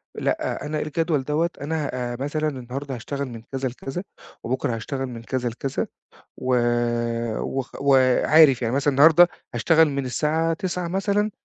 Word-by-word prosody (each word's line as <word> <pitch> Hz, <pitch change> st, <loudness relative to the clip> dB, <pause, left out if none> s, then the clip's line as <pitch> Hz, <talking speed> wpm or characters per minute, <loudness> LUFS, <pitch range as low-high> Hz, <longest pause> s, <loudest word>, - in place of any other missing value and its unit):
لأ، -, -, -2 dB
أنا 150 Hz, 0 st, -2 dB
الجدول 155 Hz, -2 st, 0 dB
دوّة، 155 Hz, +5 st, 0 dB
أنا 150 Hz, 0 st, -2 dB, 0.2 s
آآ 120 Hz, -, -5 dB
مثلًا 155 Hz, +3 st, -1 dB
النهارده 130 Hz, +1 st, -6 dB
هاشتغل 140 Hz, +4 st, -4 dB
من 115 Hz, -3 st, -8 dB
كذا 135 Hz, -1 st, -2 dB
لكذا، 135 Hz, +8 st, -6 dB, 0.4 s
وبُكره 125 Hz, -1 st, -1 dB
هاشتغل 135 Hz, +4 st, -4 dB
من 115 Hz, -2 st, -8 dB
كذا 125 Hz, -1 st, -2 dB
لكذا." 130 Hz, +3 st, -3 dB, 0.5 s
و 130 Hz, 0 st, 0 dB, 1.0 s
و -, -, -1 dB, 0.2 s
وعارف 135 Hz, +1 st, +5 dB
يعني 115 Hz, +2 st, 0 dB
مثلًا 140 Hz, +1 st, +2 dB
النهارده 160 Hz, +5 st, +7 dB, 0.3 s
هاشتغل 160 Hz, -2 st, +4 dB
من 140 Hz, -1 st, -2 dB
الساعة 160 Hz, +6 st, 0 dB
09:00 180 Hz, +1 st, -3 dB
مثلًا 200 Hz, +3 st, 0 dB
140 Hz, 145 wpm, -23 LUFS, 130-160 Hz, 1.0 s, النهارده